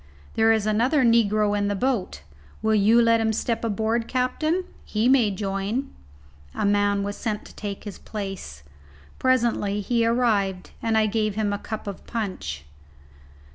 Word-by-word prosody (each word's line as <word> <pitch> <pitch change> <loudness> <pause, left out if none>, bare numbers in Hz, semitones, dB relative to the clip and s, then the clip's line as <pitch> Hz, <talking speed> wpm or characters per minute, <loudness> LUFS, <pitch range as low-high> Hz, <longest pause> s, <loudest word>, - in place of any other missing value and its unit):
There 225 0 +4
is 220 -2 +2
another 245 +7 +2
negro 215 -3 +3
in 205 0 0
the 205 - 0
boat. 200 - -1 0.4
Will 220 0 +2
you 215 +3 +5
let 230 -1 +4
him 220 0 +1
step 230 +2 -2
aboard, 225 +1 0
captain? 310 +8 0 0.2
He 220 +2 0
may 255 -5 +5
join." 200 +6 -3 0.6
A - - -1
man 205 0 +2
was 205 0 -3
sent 215 -2 -3
to - - -14
take 200 -2 -6
his 205 -3 -8
place. 195 - -7 0.6
Presently 235 -5 +1
he 230 +3 +1
arrived, 215 -6 +1
and 225 -1 +1
I 220 - +4
gave 215 -1 0
him 210 -2 0
a 205 - -3
cup 220 +1 -6
of 200 -2 -7
punch. 185 - -4
215 Hz, 160 wpm, -24 LUFS, 200-230 Hz, 0.6 s, you